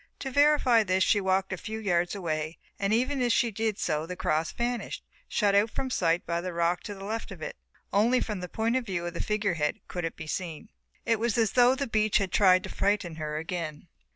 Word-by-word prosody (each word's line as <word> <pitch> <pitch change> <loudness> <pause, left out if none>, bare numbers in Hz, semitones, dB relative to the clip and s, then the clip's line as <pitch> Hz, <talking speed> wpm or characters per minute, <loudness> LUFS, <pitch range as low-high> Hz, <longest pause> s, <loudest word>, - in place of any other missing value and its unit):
To 270 - -5
verify 285 -4 +5
this 190 -2 +2
she 205 - +3
walked 190 0 +1
a - - -3
few 220 +5 -5
yards 175 -4 0
away 155 -4 -3 0.2
and 200 0 0
even 255 +5 +1
as 245 -1 +2
she 235 0 +2
did 220 0 -1
so 155 -1 -1
the 180 - -5
cross 155 -2 0
vanished, 240 0 -3 0.2
shut 205 -3 +2
out 205 +3 +4
from 260 +4 -4
sight 170 -5 +1
by 170 0 -1
the 180 0 -4
rock 170 +1 +1
to 205 - -5
the 195 - -10
left 225 +2 -4
of - - -9
it. - - -5 0.4
Only 235 +5 +4
from 210 -3 -3
the 180 0 -6
point 225 +2 0
of 260 - +1
view 175 -3 -2
of 175 - -4
the 170 - -3
figure 210 -3 0
head 150 -2 -1
could 175 - -4
it 165 - -3
be 160 - -8
seen. 170 +4 -5 0.4
It 230 -2 +2
was 235 -1 0
as 225 -3 +3
though 250 +1 +5
the 280 +1 -2
beach 215 -3 +2
had 195 -3 -1
tried 185 -2 +5
to 190 - -6
frighten 195 -5 0
her 155 -1 -3
again. 165 -1 -5
195 Hz, 235 wpm, -28 LUFS, 170-225 Hz, 0.4 s, verify